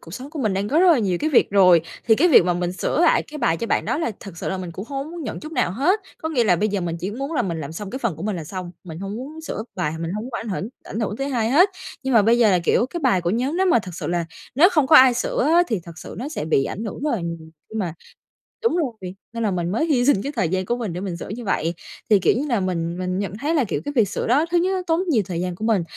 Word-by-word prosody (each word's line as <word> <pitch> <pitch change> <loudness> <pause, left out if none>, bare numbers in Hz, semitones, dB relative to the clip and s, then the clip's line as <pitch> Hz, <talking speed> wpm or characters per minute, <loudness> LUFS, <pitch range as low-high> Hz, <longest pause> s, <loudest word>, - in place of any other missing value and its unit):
cuộc 165 - -10
sống 260 +5 -8
của 315 - -7
mình 215 -8 0
đang 195 +2 -1
có 295 - +2
rất 370 - +5
là 300 - +3
nhiều 190 -6 0
cái 310 - 0
việc 280 - +4
rồi 180 -4 +6 0.3
thì 220 - +7
cái 320 +10 +3
việc 275 - +7
mà 175 0 +1
mình 175 0 -2
sửa 185 - -1
lại - - +4
cái 300 - -9
bài 165 - +2
cho 230 - -3
bạn - - +1
đó - - -1
là 320 - -1
thật 195 -4 -10
sự - - -3
là 190 - -2
mình 180 -2 -5
cũng 185 +5 -6
hông 275 -1 -3
có - - -9
muốn 340 -1 -7
nhận - - -5
chút 310 +1 -8
nào 245 - +1
hết. 325 - +2 0.2
Có 320 - -3
nghĩa 260 -7 +1
là 180 -5 +4
bây 210 +4 +1
giờ 200 -1 -1
mình 170 -2 -3
chỉ 185 +4 -3
muốn 275 +8 -4
là 315 - +1
mình 170 -4 -3
làm 145 0 -6
xong 195 +4 -6
cái 260 - -4
phần 230 - -2
của 160 - -8
mình 210 -2 -2
là 165 - -5
xong, 185 +2 -6
mình 165 -3 -8
hông 195 +3 -5
muốn 290 +6 -7
sửa 315 -8 -5
bài, 175 -5 -1
mình 165 0 -3
hông 210 +2 -4
muốn 255 - -9
ảnh 230 0 -4
hưởng 195 +1 -3 0.2
ảnh 220 - -5
hưởng 210 -1 -2
tới 275 +2 -2
hai 235 -4 0
hết. 350 +9 +6 0.3
Nhưng 265 -1 0
mà 220 - +7
bây 230 +3 +4
giờ 225 -3 +5
là, 185 - +4
kiểu, 235 - +3
cái 345 +6 -5
bài 250 - +3
của 175 0 -1
nhóm 255 - -1
nếu 380 - +2
mà 340 - +5
thực 185 -5 -7
sự - - -5
là 175 -1 0 0.3
nếu 315 +8 +7
không 305 -7 +2
có 310 - +7
ai 260 -2 +8
sửa 245 - -1
á 345 +1 +6
thì 220 -6 -1
thật 170 0 -11
sự - - -9
nó 255 +5 -4
sẽ 305 - -4
bị 145 -3 +2
ảnh 215 - -4
hưởng 215 - -6
rất 300 - 0
là 230 - -1
nhiều 170 0 -3 0.3
khi - - -12
mà 175 -6 -2 0.7
Đúng 460 - +2
rồi! 225 - -3 0.2
Nên 230 0 -3
là 210 - +1
mình 175 -2 -1
mới 230 +10 +1
hy 265 -7 +2
sinh 275 -8 +4
cái 280 - -3
thời 170 - +1
gian 185 +1 -1
của 240 +5 -1
mình 220 -8 -4
để 180 - -5
mình 185 -3 -4
sửa - - -8
như 230 +4 -6
vậy. 170 -4 0 0.4
Thì 210 -2 +6
kiểu - - +3
như 280 - -1
là 240 -6 +1
mình 175 -2 -2
mình 185 0 -2
nhận 200 -2 -3
thấy 295 +8 -1
là, 290 - +3
kiểu, 210 - -2
cái 290 - -3
việc 220 -6 +3
sửa - - -3
đó 275 +7 +3
thứ 350 - +3
nhất 360 +2 +2
nó 370 - -1
tốn 330 +1 +2
nhiều 235 -10 +3
thời 175 -2 -3
gian 180 -1 -3
của 215 - -5
mình, 215 -6 +2
215 Hz, 335 wpm, -22 LUFS, 180-275 Hz, 0.7 s, ai